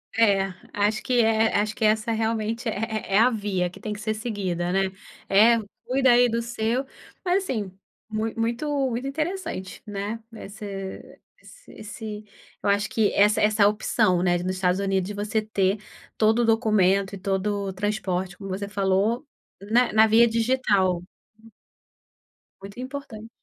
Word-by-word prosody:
É, 195 Hz, -4 st, +3 dB, 0.2 s
acho 210 Hz, +1 st, +1 dB
que 245 Hz, -2 st, +2 dB
é, 220 Hz, 0 st, +2 dB
acho 210 Hz, 0 st, -1 dB
que -, -, -4 dB
essa 215 Hz, +2 st, +2 dB
realmente 225 Hz, +1 st, -1 dB
é 215 Hz, -1 st, -3 dB
é -, -, +6 dB
a 245 Hz, +3 st, +5 dB
via 200 Hz, -5 st, -1 dB
que 180 Hz, +3 st, -11 dB
tem 215 Hz, 0 st, -4 dB
que 205 Hz, -, -8 dB
ser 215 Hz, 0 st, -1 dB
seguida, 190 Hz, -6 st, -3 dB
né. 195 Hz, 0 st, +1 dB, 0.4 s
É, 220 Hz, +4 st, +6 dB, 0.3 s
cuida 260 Hz, 0 st, +3 dB
aí 245 Hz, 0 st, +5 dB
do 230 Hz, +1 st, 0 dB
seu 235 Hz, +2 st, -1 dB, 0.4 s
mas 370 Hz, +2 st, +2 dB
assim, 210 Hz, -, -3 dB, 0.4 s
muito 220 Hz, +1 st, -3 dB, 0.5 s
muito 250 Hz, +4 st, -3 dB
interessante, 315 Hz, -, -4 dB
né. 205 Hz, +2 st, -4 dB
Esse 200 Hz, -3 st, -8 dB, 0.5 s
esse, 215 Hz, 0 st, -8 dB, 0.4 s
eu 205 Hz, -, 0 dB
acho 205 Hz, +1 st, +2 dB
que 220 Hz, -2 st, +2 dB
essa 210 Hz, +1 st, +4 dB
essa 210 Hz, -1 st, +4 dB
opção, 210 Hz, -3 st, +1 dB
né, 175 Hz, -1 st, +2 dB
de 175 Hz, -, -5 dB
nos 185 Hz, +1 st, -1 dB
Estados 185 Hz, 0 st, +1 dB
Unidos 195 Hz, -2 st, 0 dB
de 205 Hz, -, -6 dB
você 215 Hz, +2 st, -1 dB
ter 200 Hz, -1 st, 0 dB, 0.4 s
todo 220 Hz, +2 st, +3 dB
o -, -, +2 dB
documento 200 Hz, -4 st, +2 dB
e -, -, -7 dB
todo 200 Hz, +1 st, -1 dB
o 190 Hz, -, -5 dB
transporte, 190 Hz, -2 st, -2 dB
como 195 Hz, -1 st, -8 dB
você 200 Hz, +1 st, -3 dB
falou, 200 Hz, +6 st, +1 dB, 0.3 s
na 225 Hz, +5 st, +2 dB
na 220 Hz, 0 st, +7 dB
via 230 Hz, +2 st, +5 dB
digital. 220 Hz, -6 st, +1 dB, 1.6 s
Muito 200 Hz, +5 st, -10 dB
importante. 255 Hz, -4 st, -7 dB
215 Hz, 155 wpm, -25 LUFS, 195-225 Hz, 1.6 s, na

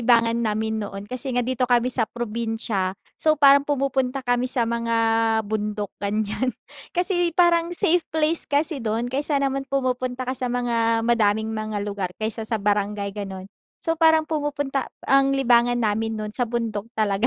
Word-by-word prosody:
libangan 230 Hz, -1 st, +3 dB
namin 220 Hz, +1 st, -1 dB
noon 200 Hz, -1 st, -6 dB
kasi 255 Hz, +5 st, -4 dB
nga 245 Hz, -, +2 dB
dito 255 Hz, 0 st, -1 dB
kami 245 Hz, 0 st, +2 dB
sa 225 Hz, -3 st, 0 dB
probinsya 225 Hz, -4 st, -3 dB, 0.2 s
so, 310 Hz, 0 st, +3 dB
parang 280 Hz, -1 st, +7 dB
pumupunta 270 Hz, -2 st, 0 dB
kami 245 Hz, 0 st, +1 dB
sa 250 Hz, -2 st, +2 dB
mga 230 Hz, 0 st, -1 dB, 0.5 s
bundok, 210 Hz, 0 st, -3 dB
ganyan. 215 Hz, +4 st, -1 dB, 0.5 s
Kasi 355 Hz, -1 st, +1 dB
parang 340 Hz, -1 st, +4 dB
safe 355 Hz, -1 st, +3 dB
place 320 Hz, +1 st, +2 dB
kasi 295 Hz, 0 st, 0 dB
dun 230 Hz, +2 st, -2 dB
kaysa 290 Hz, +2 st, +1 dB
naman 275 Hz, -1 st, -1 dB
pumupunta 255 Hz, -1 st, -1 dB
ka 255 Hz, -, -2 dB
sa 255 Hz, -1 st, -3 dB
mga 230 Hz, -2 st, +1 dB
madaming 220 Hz, -2 st, +2 dB
mga 215 Hz, -2 st, -3 dB
lugar, 200 Hz, -2 st, -3 dB
kaysa 220 Hz, 0 st, -3 dB
sa 225 Hz, -, 0 dB
barangay, 205 Hz, -1 st, -1 dB
ganun. 195 Hz, -2 st, -6 dB, 0.4 s
So, 330 Hz, -, 0 dB
parang 320 Hz, -1 st, +5 dB
pumupunta 285 Hz, -3 st, -2 dB, 0.2 s
ang 275 Hz, 0 st, +3 dB
libangan 245 Hz, -2 st, +3 dB
namin 225 Hz, 0 st, 0 dB
noon 215 Hz, 0 st, -5 dB
sa 245 Hz, +1 st, -1 dB
bundok 225 Hz, -3 st, -3 dB
talaga. 215 Hz, 0 st, +1 dB
240 Hz, 160 wpm, -23 LUFS, 215-275 Hz, 0.5 s, parang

